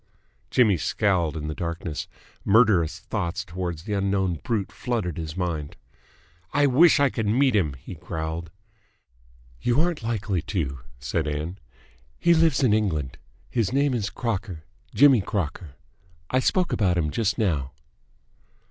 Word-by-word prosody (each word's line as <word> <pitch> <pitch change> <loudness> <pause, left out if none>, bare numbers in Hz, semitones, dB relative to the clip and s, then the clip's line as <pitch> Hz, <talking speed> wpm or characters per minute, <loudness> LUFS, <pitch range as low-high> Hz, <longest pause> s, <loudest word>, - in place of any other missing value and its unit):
Jimmy 110 -7 +4
scowled 85 -2 0
in 75 -1 -4
the 75 - -3
darkness. 85 -1 -4 0.4
Murderous 95 -6 +4
thoughts 100 -2 -3
towards 85 -3 -4
the 105 +1 -4
unknown 95 -4 0
brute 110 -5 -1
flooded 110 -10 -2
his 80 +1 -6
mind. 85 -5 -3 0.8
"I 145 0 +4
wish 145 +5 +5
I 140 -2 +3
could 110 -2 -2
meet 125 +3 +3
him!" 80 -9 +2
he 65 - -10
growled. 80 0 -5 1.1
"You 125 +3 +2
aren't 170 -2 +1
likely 110 -5 -1
to," 75 -7 -3 0.2
said 75 +6 -2
Ann. 75 +6 -4 0.6
"He 170 - +4
lives 160 -4 +3
in 115 -5 +4
England. 80 -12 -1 0.3
His 115 -4 0
name 140 +1 +2
is 105 -4 -1
Crocker. 100 -9 -4 0.3
Jimmy 135 -5 +6
Crocker. 85 -6 -4 0.6
I 130 - +3
spoke 180 +6 +1
about 90 -4 +2
him 75 -3 0
just 110 +1 0
now." 75 - 0
95 Hz, 140 wpm, -25 LUFS, 80-115 Hz, 1.1 s, Jimmy